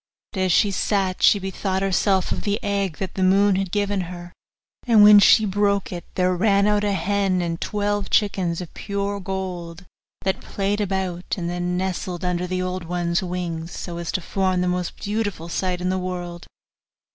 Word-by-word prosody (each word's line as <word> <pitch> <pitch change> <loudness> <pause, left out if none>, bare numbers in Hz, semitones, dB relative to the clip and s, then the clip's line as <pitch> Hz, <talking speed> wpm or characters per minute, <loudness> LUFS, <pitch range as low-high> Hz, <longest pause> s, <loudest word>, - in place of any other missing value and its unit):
But 195 - -4
as 185 -1 +2
she 200 +4 +4
sat 195 -1 0
she - - +6
bethought 190 0 -2
herself 190 0 +1
of - - -2
the 205 +1 -1
egg 200 -5 -1
that 190 - -4
the 190 - -4
moon 195 +1 +4
had 190 -1 -1
given 205 -1 0
her; 175 0 -9 0.5
and 220 -3 +7
when 210 0 +9
she 215 +2 +6
broke 200 0 0
it, 175 -2 -6
there 185 0 +2
ran 200 +2 +3
out 210 0 +2
a 205 -1 +1
hen 195 -1 0
and 170 -1 -3
twelve 205 -1 -1
chickens 185 -5 +1
of 175 - -9
pure 200 0 -3
gold, 185 -2 -5 0.4
that 190 -1 -1
played 200 +1 -2
about, 190 -3 -2
and 170 -2 -3
then 175 0 -2
nestled 185 -1 -3
under 180 0 -1
the 185 0 -2
old 185 -1 -4
one's 170 0 -1
wings, 175 -2 -4
so 170 -1 -6
as 170 - -4
to 185 - -1
form 185 0 0
the 180 - 0
most 180 -1 -2
beautiful 205 -5 -3
sight 180 +1 -1
in 180 - 0
the 185 0 0
world. 175 -2 -5
185 Hz, 190 wpm, -23 LUFS, 180-200 Hz, 0.5 s, when